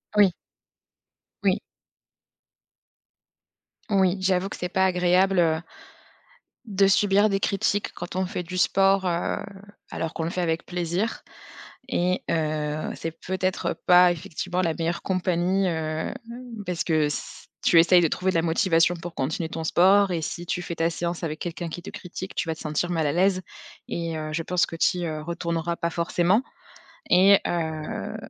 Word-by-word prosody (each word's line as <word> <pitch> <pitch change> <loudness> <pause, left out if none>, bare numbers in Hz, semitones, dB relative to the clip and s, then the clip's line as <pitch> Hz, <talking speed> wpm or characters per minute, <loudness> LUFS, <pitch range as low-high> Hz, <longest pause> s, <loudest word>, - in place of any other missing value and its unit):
Oui. 200 -3 +6 1.1
Oui. - - +3 2.3
Oui! 190 -1 +3
J'avoue 185 0 +1
que - - -7
c'est 180 - -3
pas 190 +1 +2
agréable 185 +1 +3
heu 160 -1 +2 1.0
de 195 -2 +3
subir 205 +1 +4
des 195 -1 0
critiques 200 +1 0
quand 175 +1 -6
on 190 - +1
fait 180 0 -4
du 185 +2 -6
sport, 195 +1 +3
heu, 170 -1 0 0.5
alors 165 -1 -4
qu'on 165 - -3
le - - -1
fait 180 +1 -2
avec 165 -1 -1
plaisir. 180 +5 -2 0.7
Et 180 -6 0
heu, 155 -1 -1
c'est 165 - -4
peut-être 185 +2 -2
pas, 180 0 +7
effectivement, 175 +2 -3
la 165 -3 +1
meilleure 170 +1 -2
compagnie, 185 +1 +1
heu, - - 0 0.4
hem, - - -5 0.5
parce 180 -2 -1
que 160 -2 +1
s 150 0 -5 0.2
tu 170 - +5
essayes 175 +2 +6
de 165 - +3
trouver 190 +4 0
de - - -1
la 165 - +3
motivation 170 0 +2
pour 170 0 -8
continuer 160 +4 -2
ton 160 -1 -4
sport 190 +3 +4
et 165 - -2
si 175 +3 -5
tu 180 - -2
fais 170 - -5
ta 165 0 +1
séance 170 +1 -3
avec 155 -1 -4
quelqu'un 170 0 -4
qui 175 +2 -7
te 190 - -8
critique, 185 -2 -8
tu - - -2
vas 160 - 0
te 160 - -14
sentir 155 +3 -1
mal 160 -3 0
à 145 - +1
l'aise 185 +2 +2 0.4
et 165 -1 -3
heu, 155 0 -4
je 165 +1 -1
pense 180 +1 +1
que - - -9
tu 180 - +2
y, - - -2
heu, 155 -1 -4
retourneras 170 0 -2
pas 170 0 -2
forcément 175 +6 +1 0.7
et 190 +2 +6
heu, 160 -2 -3
175 Hz, 170 wpm, -25 LUFS, 165-185 Hz, 2.3 s, pas